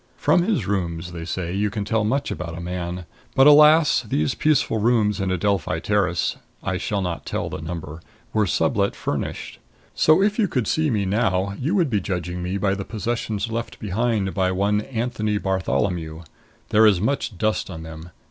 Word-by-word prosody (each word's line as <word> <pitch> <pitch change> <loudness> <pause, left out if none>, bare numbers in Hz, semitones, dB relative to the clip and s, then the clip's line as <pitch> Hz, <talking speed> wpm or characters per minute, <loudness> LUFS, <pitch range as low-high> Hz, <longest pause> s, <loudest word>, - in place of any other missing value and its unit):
From 175 - +3
his 180 - 0
rooms, 85 -3 -2
they 85 -1 -6
say, 85 0 -3
you 105 +2 0
can 100 0 -4
tell 110 +1 +1
much 135 +7 0
about 85 -1 -5
a - - -5
man. 90 0 -4 0.3
But, 135 - +6
alas! 150 +2 +7
these 75 -10 -1
peaceful 145 -7 +1
rooms 110 -2 +2
in 95 - -1
Adelphi 95 -3 0
Terrace 95 -2 0 0.3
I 95 -2 -1
shall 100 +2 -2
not 85 -6 -3
tell - - -3
the - - -5
number 80 -1 -6 0.3
were 110 -2 +2
sublet 75 - +1
furnished. - - -4 0.3
So 155 +2 +4
if 210 +2 +1
you 210 - +3
could 125 -8 -1
see 155 +8 +1
me 105 -5 0
now 100 -1 0
you 155 +10 0
would 170 -9 +2
be 105 -3 +1
judging 90 -1 -3
me 90 +2 -2
by 95 0 +1
the 100 0 -3
possessions 110 0 -3
left 115 +1 -4
behind 105 -1 -1
by 95 -2 +1
one 100 +3 +1
Anthony 110 -3 -2
Bartholomew. 90 -4 -1 0.5
There 110 +1 +6
is 100 -4 +4
much 110 -2 -1
dust 110 +2 0
on 80 -3 -7
them. 80 +1 -9
100 Hz, 185 wpm, -23 LUFS, 90-115 Hz, 0.5 s, alas